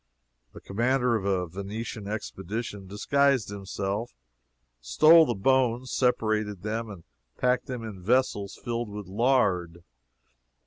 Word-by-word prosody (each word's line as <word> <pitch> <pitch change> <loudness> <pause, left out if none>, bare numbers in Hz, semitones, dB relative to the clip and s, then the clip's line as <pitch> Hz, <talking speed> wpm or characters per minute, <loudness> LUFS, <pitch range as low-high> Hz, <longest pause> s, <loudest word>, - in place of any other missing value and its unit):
The - - -11
commander 120 +4 +1
of 105 -3 -2
a 95 -2 +1
Venetian 100 +4 -6
expedition 105 0 -5
disguised 135 +4 +1
himself, 100 - -4 0.6
stole 155 - +6
the 120 - -1
bones, 125 +3 +1
separated 110 -6 0
them, 110 +1 -3
and 95 -5 -10 0.3
packed 125 0 +1
them 125 -3 -5
in 105 -4 -8
vessels 105 -2 0
filled 120 -2 -3
with 105 0 -7
lard. 95 -6 +1
110 Hz, 120 wpm, -27 LUFS, 100-125 Hz, 0.6 s, stole